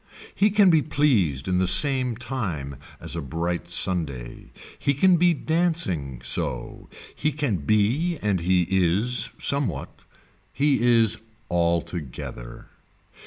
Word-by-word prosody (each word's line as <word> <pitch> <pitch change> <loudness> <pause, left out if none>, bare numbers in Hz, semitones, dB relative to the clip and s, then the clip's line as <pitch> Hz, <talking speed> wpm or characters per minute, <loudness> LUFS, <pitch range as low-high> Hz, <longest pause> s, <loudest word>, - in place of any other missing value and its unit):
He 210 - +3
can 200 -2 +5
be 160 -2 +4
pleased 110 - +1
in 90 0 +1
the 95 - +1
same 130 +4 +3
time 85 - -4 0.2
as - - -5
a 85 - -3
bright 85 +5 -3
Sunday. 80 -9 -2 0.3
He 140 - 0
can 180 +5 +4
be 175 0 +3
dancing 150 - -1
so. - - -2 0.2
He 155 - -1
can 140 -9 -1
be 110 - +1
and 100 -3 +1
he 90 +1 +2
is 95 +7 +1
somewhat. 140 -2 -2 0.5
He 140 -2 +1 0.2
is 110 -1 +3 0.3
altogether. 85 -8 -3
100 Hz, 120 wpm, -24 LUFS, -, 0.5 s, can